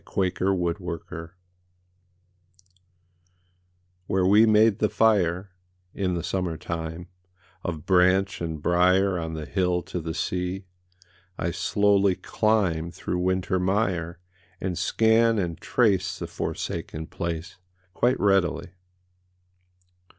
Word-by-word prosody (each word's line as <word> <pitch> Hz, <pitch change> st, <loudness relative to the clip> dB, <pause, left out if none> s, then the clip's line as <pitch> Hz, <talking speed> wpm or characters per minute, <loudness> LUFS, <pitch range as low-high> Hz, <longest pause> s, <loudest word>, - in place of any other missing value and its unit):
WHERE 95 Hz, -2 st, +2 dB
THE 95 Hz, -, -3 dB
PICNIC 90 Hz, -3 st, 0 dB
WAS 85 Hz, -2 st, -6 dB, 2.8 s
WHERE 95 Hz, -1 st, +1 dB
we 105 Hz, +3 st, +6 dB
made 110 Hz, 0 st, +4 dB
the 105 Hz, -, +2 dB
fire, 95 Hz, -4 st, +2 dB, 0.4 s
In 90 Hz, -3 st, -1 dB
the 85 Hz, -, -3 dB
summer 90 Hz, -3 st, -2 dB
time, 80 Hz, +1 st, -5 dB, 0.6 s
Of 80 Hz, -3 st, -4 dB
branch 95 Hz, +1 st, +3 dB
and 80 Hz, -2 st, -3 dB
briar 90 Hz, +2 st, +3 dB
On 80 Hz, -1 st, -4 dB
the 80 Hz, -1 st, -5 dB
hill 90 Hz, -1 st, 0 dB
to 90 Hz, 0 st, -5 dB
the 80 Hz, -1 st, -5 dB
sea 90 Hz, +1 st, -2 dB, 0.7 s
I 85 Hz, -, -1 dB
slowly 100 Hz, +1 st, +2 dB
climb 95 Hz, -8 st, 0 dB
Through 90 Hz, +1 st, -4 dB
winter 95 Hz, +1 st, 0 dB
mire, 90 Hz, -3 st, 0 dB, 0.4 s
And 95 Hz, -2 st, -3 dB
scan 115 Hz, +4 st, +3 dB
and 85 Hz, -4 st, -2 dB
trace 95 Hz, -6 st, +1 dB
The -, -, -5 dB
forsaken 80 Hz, +1 st, -4 dB
place 85 Hz, +1 st, -5 dB, 0.4 s
Quite 125 Hz, +5 st, +1 dB
readily. 95 Hz, -4 st, +1 dB
90 Hz, 115 wpm, -25 LUFS, 85-100 Hz, 2.8 s, we